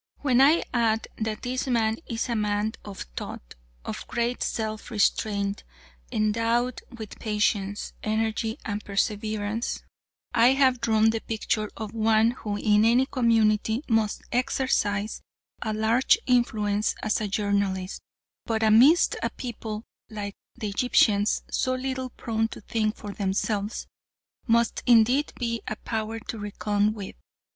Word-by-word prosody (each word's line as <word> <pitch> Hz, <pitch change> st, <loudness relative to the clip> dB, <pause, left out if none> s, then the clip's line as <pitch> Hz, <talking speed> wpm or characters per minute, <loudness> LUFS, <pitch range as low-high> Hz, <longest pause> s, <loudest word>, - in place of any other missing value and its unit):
When 260 Hz, -3 st, +4 dB
I 300 Hz, +5 st, +5 dB
add 225 Hz, -2 st, +1 dB
that 220 Hz, -1 st, -3 dB
this 255 Hz, +1 st, -2 dB
man 225 Hz, -3 st, +1 dB
is 230 Hz, -1 st, -2 dB
a 235 Hz, -, -1 dB
man 210 Hz, 0 st, 0 dB
of 200 Hz, -2 st, -8 dB
thought, -, -, -7 dB, 0.3 s
of -, -, -6 dB
great 240 Hz, +1 st, -1 dB
self 220 Hz, -1 st, -3 dB
restraint, 205 Hz, -2 st, 0 dB, 0.5 s
endowed 230 Hz, +3 st, +1 dB
with 225 Hz, -4 st, -9 dB
patience, 210 Hz, -2 st, -1 dB
energy, 220 Hz, +1 st, -1 dB
and 210 Hz, 0 st, -3 dB
perseverance, 210 Hz, +2 st, -2 dB, 0.5 s
I 240 Hz, +2 st, +6 dB
have 260 Hz, -3 st, +3 dB
drawn 225 Hz, -1 st, +4 dB
the 225 Hz, -, -2 dB
picture 215 Hz, -1 st, -2 dB
of 220 Hz, -1 st, -6 dB
one 220 Hz, 0 st, +3 dB
who, 210 Hz, -4 st, -4 dB
in 210 Hz, 0 st, +3 dB
any 240 Hz, +3 st, +4 dB
community, 225 Hz, -1 st, +2 dB
must 225 Hz, -3 st, +1 dB
exercise 240 Hz, -5 st, 0 dB, 0.4 s
a 220 Hz, -, -2 dB
large 220 Hz, +4 st, +3 dB
influence 215 Hz, -4 st, +1 dB
as 215 Hz, +1 st, 0 dB
a 215 Hz, -, -1 dB
journalist, 200 Hz, -2 st, -1 dB, 0.5 s
but 225 Hz, -1 st, 0 dB
amidst 245 Hz, -, +6 dB
a -, -, 0 dB
people 220 Hz, -3 st, -6 dB, 0.3 s
like 205 Hz, -2 st, -5 dB, 0.2 s
the 225 Hz, -3 st, -4 dB
Egyptians, 210 Hz, -1 st, +3 dB
so 255 Hz, 0 st, +1 dB
little 260 Hz, 0 st, -3 dB
prone 225 Hz, -2 st, -1 dB
to -, -, -10 dB
think 215 Hz, 0 st, -1 dB
for 205 Hz, -1 st, -7 dB
themselves, 205 Hz, +2 st, -1 dB, 0.6 s
must 235 Hz, -1 st, +2 dB
indeed 245 Hz, +5 st, +5 dB
be 230 Hz, -2 st, -2 dB
a 215 Hz, -, -2 dB
power 220 Hz, 0 st, -3 dB
to 225 Hz, -1 st, -6 dB
reckon 205 Hz, 0 st, 0 dB
with. 200 Hz, -3 st, -7 dB
220 Hz, 135 wpm, -26 LUFS, 210-235 Hz, 0.6 s, I